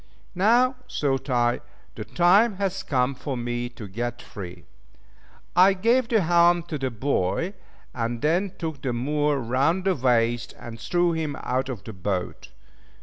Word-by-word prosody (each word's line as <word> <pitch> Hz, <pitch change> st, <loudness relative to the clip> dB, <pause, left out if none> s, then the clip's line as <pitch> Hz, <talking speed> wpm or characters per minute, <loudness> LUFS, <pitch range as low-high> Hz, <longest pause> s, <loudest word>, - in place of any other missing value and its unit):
Now, 240 Hz, +8 st, +3 dB
thought 135 Hz, -1 st, -1 dB
I, 120 Hz, -1 st, +2 dB, 0.3 s
the 110 Hz, -, -6 dB
time 195 Hz, -, +4 dB
has 195 Hz, -1 st, -2 dB
come 135 Hz, -6 st, 0 dB
for 135 Hz, 0 st, -5 dB
me 120 Hz, 0 st, -3 dB
to 115 Hz, -3 st, -9 dB
get 120 Hz, +5 st, -4 dB
free! 90 Hz, -5 st, -9 dB, 0.9 s
I 185 Hz, +2 st, +7 dB
gave 230 Hz, +6 st, +2 dB
the 225 Hz, -3 st, +3 dB
helm 175 Hz, 0 st, +4 dB
to 160 Hz, -3 st, -5 dB
the 135 Hz, -1 st, -1 dB
boy, 130 Hz, -, -1 dB, 0.4 s
and 115 Hz, -1 st, -2 dB
then 175 Hz, +5 st, +1 dB
took 160 Hz, -5 st, -5 dB
the 130 Hz, -3 st, -2 dB
Moor 145 Hz, +4 st, 0 dB
round 135 Hz, +9 st, +1 dB
the 190 Hz, -, +3 dB
waist, 120 Hz, -4 st, +1 dB
and 115 Hz, -1 st, -9 dB
threw 175 Hz, -1 st, +1 dB
him 160 Hz, -3 st, -2 dB
out 130 Hz, +2 st, -1 dB
of 120 Hz, -8 st, -6 dB
the 110 Hz, -, -8 dB
boat. 90 Hz, -1 st, -4 dB
140 Hz, 155 wpm, -25 LUFS, 120-175 Hz, 0.9 s, I